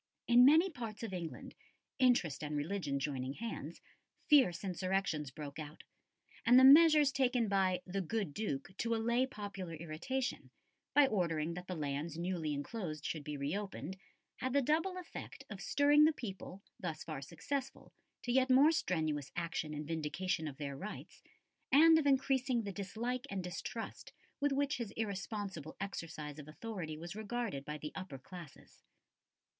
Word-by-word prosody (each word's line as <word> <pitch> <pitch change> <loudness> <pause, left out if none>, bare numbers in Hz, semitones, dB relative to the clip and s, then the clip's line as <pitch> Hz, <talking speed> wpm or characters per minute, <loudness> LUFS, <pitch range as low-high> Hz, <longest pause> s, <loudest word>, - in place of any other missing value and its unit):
In 240 +1 +7
many 315 +7 +7
parts 230 -6 -6
of 220 -4 -4
England, 170 -3 -6 0.5
interest 240 - +3
and 150 0 -2
religion 145 -2 -1
joining 135 -2 -2
hands, 230 +8 -6 0.5
fierce 265 - +5
insurrections 185 -5 -1
broke 140 +2 -8
out, 150 0 -8 0.6
and 245 +2 +7
the - - +6
measures 300 +1 +8
taken 250 -4 +2
by 190 -2 +1
"the 195 +1 -2
good 195 -3 -2
Duke" 190 -3 -3
to 230 -1 +1
allay 235 +3 +2
popular 200 -7 -6
irritation, 170 - -3 0.5
by 290 -1 +8
ordering 170 - 0
that 180 +1 -7
the 185 - -3
lands 150 +1 -3
newly 170 -3 -2
enclosed 155 0 -4
should 155 -3 -3
be 150 0 -5
re 140 +5 -2
opened, 200 -2 -5 0.4
had 255 0 -2
the 280 - +4
double 325 +7 +1
effect 360 - -8
of - - -6
stirring 290 +1 +5
the 315 - +4
people, 195 -6 -7 0.2
thus 165 -5 -4
far 155 -4 -5
successful, 250 - -5 0.3
to 245 - -1
yet 260 +1 +3
more 275 +5 +7
strenuous 155 - -1
action 165 -2 -2
in 150 0 -4
vindication 160 +3 -2
of 140 -2 -7
their 140 -2 -4
rights, 210 +9 -8 0.5
and 320 +3 +8
of 290 - 0
increasing 265 -3 +2
the 200 - -4
dislike 235 +7 -3
and 195 -2 -3
distrust 180 0 -6 0.3
with 285 0 +2
which 285 +1 +1
his 235 -4 -4
irresponsible 200 -6 -4
exercise 160 -6 -5
of 150 - -9
authority 165 -2 -6
was 170 +4 -7
regarded 215 - -3
by 150 +1 -5
the 150 0 -6
upper 185 -8 -6
classes. 170 +2 -12
190 Hz, 160 wpm, -35 LUFS, 155-245 Hz, 0.6 s, measures